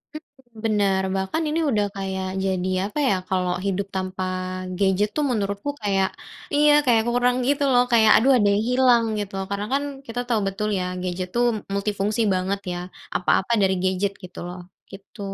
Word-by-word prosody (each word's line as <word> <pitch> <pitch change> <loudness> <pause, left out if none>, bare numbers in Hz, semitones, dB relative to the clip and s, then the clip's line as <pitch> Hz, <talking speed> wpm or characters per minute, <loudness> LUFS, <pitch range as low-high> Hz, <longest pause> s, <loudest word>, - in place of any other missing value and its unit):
Mhm, 265 -7 -13
bener 200 -3 +2
bahkan 190 +12 -1
ini 320 +2 0
udah 210 -4 +2
kayak 190 -1 -3 0.2
jadi 185 -1 -1 0.2
apa 295 - -5
ya 195 - +3
kalau 180 -1 0
hidup 195 0 -1
tanpa 185 0 -3 0.5
gadget 200 +2 +2
tuh 300 -1 +1
menurutku 200 +2 -2
kayak 195 -2 +1 0.5
iya 295 0 +5
kayak 230 -3 +4
kurang 245 +1 +2
gitu 285 0 +2
loh 245 -1 +5
kayak 220 -2 +6
aduh 265 +5 +4
ada 205 -3 +3
yang 210 - +1
hilang 250 -2 +4 0.2
gitu 195 -1 -5
karena 200 +1 -2
kan 280 +1 +1 0.2
kita 235 +1 -4
tahu 235 -3 +1
betul 210 +2 -2
ya 180 - -1 0.2
gadget 180 0 -3
tuh 240 0 +3 0.3
multifungsi 205 +2 -1
banget 190 +2 -1
ya 175 - -3 0.4
apa-apa 190 +4 +1
dari 190 -1 +3
gadget 190 +2 0
gitu 180 0 -10
loh 180 +1 -7 0.3
gitu. 195 +3 -14
205 Hz, 170 wpm, -23 LUFS, 190-240 Hz, 0.5 s, kayak